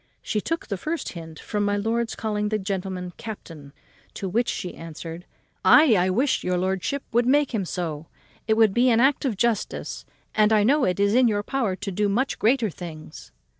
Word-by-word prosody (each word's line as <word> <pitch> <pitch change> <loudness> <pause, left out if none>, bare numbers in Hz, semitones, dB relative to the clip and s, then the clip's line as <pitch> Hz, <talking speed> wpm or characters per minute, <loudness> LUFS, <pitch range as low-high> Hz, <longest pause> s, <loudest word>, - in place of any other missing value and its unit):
She 210 - -1
took 330 +8 -3
the 200 - -3
first 315 - -3
hint 165 -2 -9
from 205 +5 -2
my 205 0 +1
lord's 225 +2 -1
calling 210 -1 -2
the 215 - 0
gentleman 190 -2 -4
captain; 165 -10 -9 0.4
to 195 - -4
which 230 +6 0
she 180 - -4
answered, 165 +1 -8 0.4
"Ay, 300 -8 +7
I 180 0 +2
wish 255 +9 +1
your 180 0 0
lordship 190 +10 -1
would 240 +1 +2
make 285 0 +3
him 205 -4 -1
so. 165 -3 -4 0.4
It 220 - +3
would 220 -3 +5
be 245 +3 +4
an 230 -1 +4
act 270 +3 +3
of 235 -7 -1
justice, 230 -1 -1 0.3
and 215 0 +3
I 215 -1 +4
know 275 +5 +3
it 180 +1 0
is 200 +1 +3
in 250 +1 +5
your 205 -2 0
power 230 -6 -1
to 200 +1 -5
do 205 +2 0
much 250 +7 0
greater 230 -2 +2
things." 155 - -10
210 Hz, 200 wpm, -24 LUFS, 180-235 Hz, 0.4 s, Ay